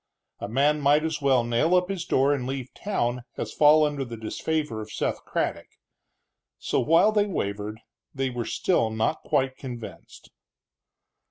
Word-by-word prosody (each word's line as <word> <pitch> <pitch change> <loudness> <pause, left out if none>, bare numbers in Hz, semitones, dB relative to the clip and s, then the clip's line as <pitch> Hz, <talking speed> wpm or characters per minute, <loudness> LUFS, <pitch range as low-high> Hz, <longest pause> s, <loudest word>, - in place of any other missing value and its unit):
A - - -4
man 145 +5 +2
might 145 +2 +4
as 160 -2 -2
well 135 -3 +3
nail 120 +9 +2
up 180 0 +3
his 190 -4 -3
door 135 +2 +3
and 130 -3 -3
leave 130 -1 -5
town 125 -12 -2 0.2
as - - -4
fall 150 +1 +6
under 145 -2 -2
the 120 -3 -7
disfavor 115 +2 -3
of 110 0 -9
Seth - - -2
Craddock. - - -2 0.9
So, - - -1
while 165 +7 +4
they 210 -1 +2
wavered, 105 - -3 0.3
they 135 -1 -2
were 120 -2 -3
still 145 -7 +1
not 110 +8 -1
quite 130 -1 0
convinced. 120 -4 -9
135 Hz, 160 wpm, -26 LUFS, 120-155 Hz, 0.9 s, fall